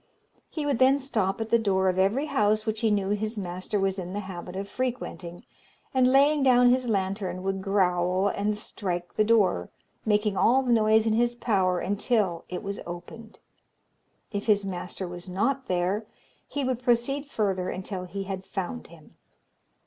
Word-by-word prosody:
He 305 Hz, -2 st, -4 dB
would 280 Hz, -5 st, 0 dB
then 265 Hz, +2 st, +5 dB
stop 215 Hz, -8 st, -1 dB
at 225 Hz, 0 st, -4 dB
the 235 Hz, -, +5 dB
door 190 Hz, -3 st, +1 dB
of 185 Hz, 0 st, +1 dB
every 210 Hz, +10 st, +2 dB
house 215 Hz, -5 st, +1 dB
which 220 Hz, -1 st, -2 dB
he 225 Hz, -, +3 dB
knew 200 Hz, -2 st, +1 dB
his 215 Hz, +2 st, -2 dB
master 185 Hz, +2 st, -3 dB
was 195 Hz, 0 st, 0 dB
in 180 Hz, 0 st, -5 dB
the 205 Hz, -, -2 dB
habit 185 Hz, -2 st, -8 dB
of 195 Hz, +1 st, -4 dB
frequenting, 215 Hz, -9 st, -4 dB, 0.5 s
and, 255 Hz, -1 st, +4 dB
laying 285 Hz, +2 st, +4 dB
down 250 Hz, -2 st, +5 dB
his 255 Hz, 0 st, +1 dB
lantern, 190 Hz, -3 st, -1 dB
would 195 Hz, 0 st, -2 dB
growl 185 Hz, -1 st, +1 dB
and 205 Hz, +1 st, -1 dB
strike 175 Hz, -4 st, -4 dB
the 215 Hz, -, +3 dB
door, 205 Hz, -, +2 dB, 0.3 s
making 210 Hz, -1 st, +1 dB
all 255 Hz, +7 st, +4 dB
the 245 Hz, -2 st, +2 dB
noise 220 Hz, 0 st, +4 dB
in 220 Hz, -, +2 dB
his 240 Hz, +2 st, +2 dB
power 190 Hz, -7 st, +1 dB
until 200 Hz, -3 st, 0 dB
it 180 Hz, +3 st, -5 dB
was 200 Hz, 0 st, -4 dB
opened. 175 Hz, +6 st, -9 dB, 0.9 s
If 205 Hz, 0 st, -4 dB
his 205 Hz, -2 st, +3 dB
master 185 Hz, 0 st, -4 dB
was 175 Hz, +1 st, -8 dB
not 245 Hz, +9 st, -1 dB
there, 185 Hz, +4 st, 0 dB, 0.4 s
he 285 Hz, -, -3 dB
would 255 Hz, -2 st, -1 dB
proceed 250 Hz, +4 st, +1 dB
further 190 Hz, -8 st, -1 dB
until 185 Hz, 0 st, -5 dB
he 195 Hz, +2 st, -5 dB
had 190 Hz, -1 st, -5 dB
found 195 Hz, +5 st, -5 dB
him. 165 Hz, -2 st, -17 dB
205 Hz, 175 wpm, -27 LUFS, 185-235 Hz, 0.9 s, then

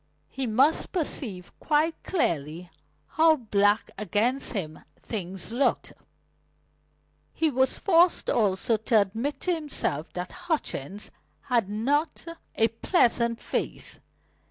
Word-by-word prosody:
He 265 Hz, -1 st, -3 dB
must 265 Hz, +8 st, +2 dB
perceive 235 Hz, -, -1 dB
quite 310 Hz, +2 st, +1 dB
clearly 170 Hz, -, -2 dB, 0.3 s
how 315 Hz, -, +4 dB
black 210 Hz, -4 st, +1 dB
against 230 Hz, +6 st, +1 dB
him 160 Hz, -8 st, -4 dB, 0.2 s
things 190 Hz, -2 st, -6 dB
looked. 250 Hz, 0 st, 0 dB, 1.4 s
He 320 Hz, -1 st, +1 dB
was 260 Hz, 0 st, +1 dB
forced 350 Hz, -2 st, +3 dB
also 210 Hz, +1 st, +1 dB
to 220 Hz, +1 st, +3 dB
admit 225 Hz, +9 st, -2 dB
to 365 Hz, -, +1 dB
himself 290 Hz, -, -2 dB
that 180 Hz, 0 st, -5 dB
Hutchings 250 Hz, -, -4 dB, 0.3 s
had 240 Hz, -7 st, 0 dB
not 280 Hz, +12 st, -1 dB, 0.3 s
a 225 Hz, 0 st, +3 dB
pleasant 235 Hz, -, +1 dB
face. -, -, -4 dB
230 Hz, 110 wpm, -26 LUFS, 200-295 Hz, 1.4 s, how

